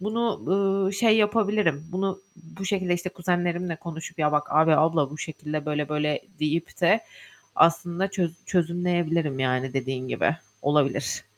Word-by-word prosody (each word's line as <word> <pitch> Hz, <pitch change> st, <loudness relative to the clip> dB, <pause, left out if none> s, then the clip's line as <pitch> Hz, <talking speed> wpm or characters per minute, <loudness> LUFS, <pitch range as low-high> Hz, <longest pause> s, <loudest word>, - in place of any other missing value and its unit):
bunu, 225 Hz, +2 st, -1 dB
ııı, 195 Hz, 0 st, +2 dB
şey 220 Hz, +2 st, +4 dB
yapabilirim. 210 Hz, -8 st, +2 dB
Bunu, 190 Hz, +1 st, -1 dB, 0.2 s
bu 180 Hz, +2 st, -10 dB
şekilde 185 Hz, -2 st, 0 dB
işte 175 Hz, +1 st, -4 dB
kuzenlerimle 175 Hz, -1 st, -1 dB
konuşup 165 Hz, 0 st, -8 dB
"Ya, 150 Hz, -1 st, +2 dB
bak, 150 Hz, 0 st, +1 dB
abi, 155 Hz, +1 st, +5 dB
abla 155 Hz, -3 st, +3 dB
bu 150 Hz, -, -9 dB
şekilde 155 Hz, -1 st, -5 dB
böyle, 150 Hz, -1 st, -1 dB
böyle." 150 Hz, -1 st, 0 dB, 0.2 s
deyip 155 Hz, +4 st, -2 dB
de 180 Hz, +6 st, +4 dB, 0.6 s
aslında 170 Hz, +3 st, +3 dB
çöz 175 Hz, -5 st, -1 dB
çözümleyebilirim, 170 Hz, -4 st, 0 dB
yani, 130 Hz, 0 st, 0 dB
dediğin 130 Hz, -1 st, -3 dB
gibi. -, -, +1 dB, 0.3 s
Olabilir. 145 Hz, -2 st, +1 dB
170 Hz, 140 wpm, -25 LUFS, 150-190 Hz, 0.6 s, abi